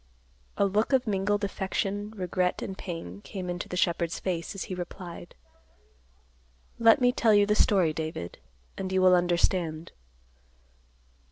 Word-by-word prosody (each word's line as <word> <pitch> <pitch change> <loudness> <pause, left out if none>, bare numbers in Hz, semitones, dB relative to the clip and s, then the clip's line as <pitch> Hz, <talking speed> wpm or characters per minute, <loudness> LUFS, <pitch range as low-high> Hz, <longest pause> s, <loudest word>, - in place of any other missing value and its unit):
A 200 - +3
look 210 +6 +1
of 260 -1 +3
mingled 205 0 0
affection, 200 +1 -2
regret 180 -1 -1
and 195 - -5
pain, 165 - -7
came 185 - -5
into 175 +1 -5
the 180 - -4
shepherd's 170 -2 0
face, 180 +1 -3
as 195 - -4
he - - -6
replied, 175 -1 -8 1.4
"Let 230 +4 +6
me 245 -1 +4
tell 225 -4 +3
you 205 0 +5
the 210 - +2
story, 190 -6 +3
David, 155 - -5 0.4
and 190 -1 -3
you 190 - +2
will 185 -1 +6
understand." 175 -2 +1
185 Hz, 145 wpm, -28 LUFS, 175-205 Hz, 1.4 s, Let